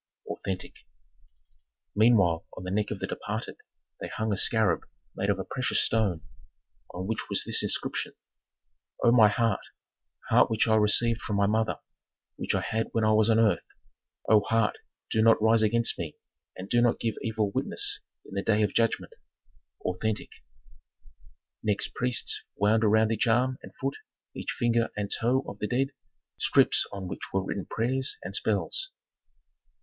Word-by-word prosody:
" - - -31
Authentic. 95 -1 -5 1.2
Meanwhile 100 -7 +3
on - - -7
the 90 - -4
neck 105 +1 0
of 105 - -3
the - - -3
departed - - -5 0.4
they - - -5
hung 110 -1 -2
a - - +1
scarab 100 -3 +3 0.3
made 100 - -1
of 100 - +2
a 95 - -3
precious 130 +5 -1
stone, 100 -8 +1 0.7
on 90 +1 -5
which 110 +2 -3
was - - +1
this - - +2
inscription: - - -1 0.9
"O 120 - +6
my 115 -3 +7
heart, 115 -1 +1 0.7
heart - - +5
which 110 0 +1
I 110 - +3
received 110 +2 +3
from 105 - -3
my 100 0 +3
mother, 110 +2 +1 0.6
which - - -2
I - - +1
had 110 0 -1
when 115 - +1
I 110 - +4
was 110 +1 +4
on 110 - +4
earth, 110 -6 +3 0.6
O 110 - +6
heart 110 0 0 0.3
do 110 - +2
not 115 0 +5
rise 110 +1 +4
against 115 +2 +1
me 80 -3 -5 0.4
and 95 - -7
do 120 +3 +3
not 120 -1 +2
give 115 -1 -1
evil 110 -3 -1
witness - - 0 0.3
in - - -13
the 100 - -1
day 110 +1 +2
of 105 - 0
judgment." 115 -1 0 0.7
Authentic. 105 +4 -2 1.3
Next 105 -2 -1
priests 125 -2 0
wound 110 +2 +2
around 110 +1 +3
each 115 +2 0
arm 125 +3 +2
and - - -11
foot, 135 +1 -2 0.4
each - - -6
finger 115 0 +1
and 105 -1 -3
toe 125 +4 +1
of 100 - -8
the 105 - -2
dead, 135 +4 0 0.5
strips - - +3
on 100 -2 -6
which - - -7
were 95 0 0
written 95 0 -4
prayers 130 +4 0
and - - -6
spells. - - 0
110 Hz, 165 wpm, -28 LUFS, 100-115 Hz, 1.3 s, my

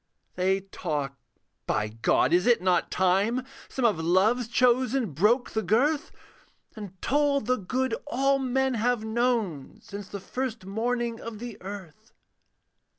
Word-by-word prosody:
They 190 +1 +1
talk; 150 -7 -3 0.5
by 105 0 0
God, 115 +8 +2
is 180 +5 +3
it 240 - +5
not 180 -1 +1
time 200 +7 +1 0.2
Some 260 - -1
of 210 -8 +3
Love's 195 +9 +2
chosen 250 -2 +2
broke 210 - +2
the 220 - 0
girth, 280 - +1 0.6
And 200 -4 -9
told 285 0 +2
the 255 +1 +2
good 255 +6 -1
all 275 +1 +2
men 265 0 +1
have 235 0 0
known 220 - -1
Since 200 -1 -8
the 200 - -6
first 240 0 -4
morning 230 +3 -2
of 230 -2 -7
the 235 0 -8
earth? 190 -5 -9
220 Hz, 140 wpm, -27 LUFS, 185-250 Hz, 0.6 s, it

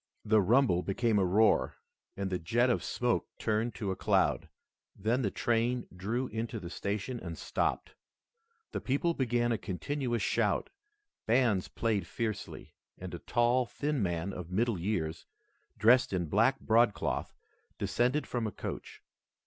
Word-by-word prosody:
The 110 0 +4
rumble 105 -3 +3
became 105 +3 +1
a - - +3
roar, 105 +5 +3 0.4
and 100 -1 -2
the 90 - -1
jet 120 +9 +2
of - - 0
smoke 120 -1 0
turned 110 +2 -1
to 100 -4 -2
a - - -2
cloud. - - +1 0.5
Then 120 +4 0
the 105 - +1
train 120 +3 0
drew 110 +8 -2
into 115 +1 -4
the 85 -2 -8
station 105 +7 -3
and 85 -5 -7
stopped. - - -2 0.8
The - - -3
people 145 +6 +1
began 120 -4 +1
a 115 - 0
continuous 120 +5 -2
shout, - - +1 0.6
bands 115 -5 +3
played 105 -6 -1
fiercely, 110 -3 -4 0.2
and 90 -1 -8
a 85 - -5
tall, 120 +3 +2
thin 145 0 -2
man 90 0 -1
of 90 -2 -7
middle 105 +1 0
years, 85 -4 -2 0.5
dressed 120 0 +5
in 90 -2 0
black 115 - +2
broadcloth, 115 -1 +1 0.4
descended 125 +5 +1
from 120 -3 -2
a - - -4
coach. - - -7
110 Hz, 150 wpm, -31 LUFS, 95-120 Hz, 0.8 s, dressed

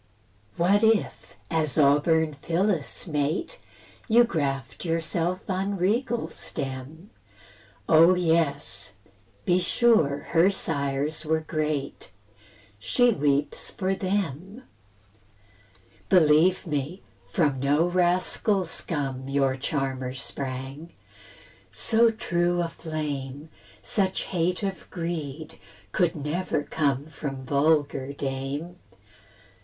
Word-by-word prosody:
What 195 +5 +3
if, 220 -1 +1 0.2
as 155 -5 0
auburn 155 +2 +3
Phyllis' 170 +2 -1
mate, 155 - -2 0.5
You 240 +1 +6
graft 140 - -2
yourself 170 +2 -1
on 195 +1 -1
regal 230 +6 0
stem? 135 +8 -6 0.8
Oh 165 +3 +6
yes! 145 - 0 0.5
be 180 0 +3
sure 175 - +3
her 170 +3 +5
sires 145 -4 -1
were 160 0 0
great; 155 -3 -3 0.7
She 245 - +3
weeps 145 -5 0
for 190 -1 -1
THEM. 190 - -3 1.5
Believe 170 0 +4
me, 150 +3 -3 0.3
from 145 - +1
no 145 +5 +2
rascal 180 +2 +2
scum 135 -5 -3
Your 135 -1 +1
charmer 130 -2 -3
sprang; 135 +3 -5 0.8
so 230 0 +4
true 175 -5 0
a 170 - -3
flame, 150 -3 -5 0.3
Such 190 -2 0
hate 180 +2 -1
of 195 -5 -4
greed, 160 -3 -5 0.3
could 175 -2 +1
never 150 +1 -2
come 140 -3 0
From 135 -4 -6
vulgar 140 -1 +1
dame. 140 +5 -4
160 Hz, 95 wpm, -26 LUFS, 140-180 Hz, 1.5 s, You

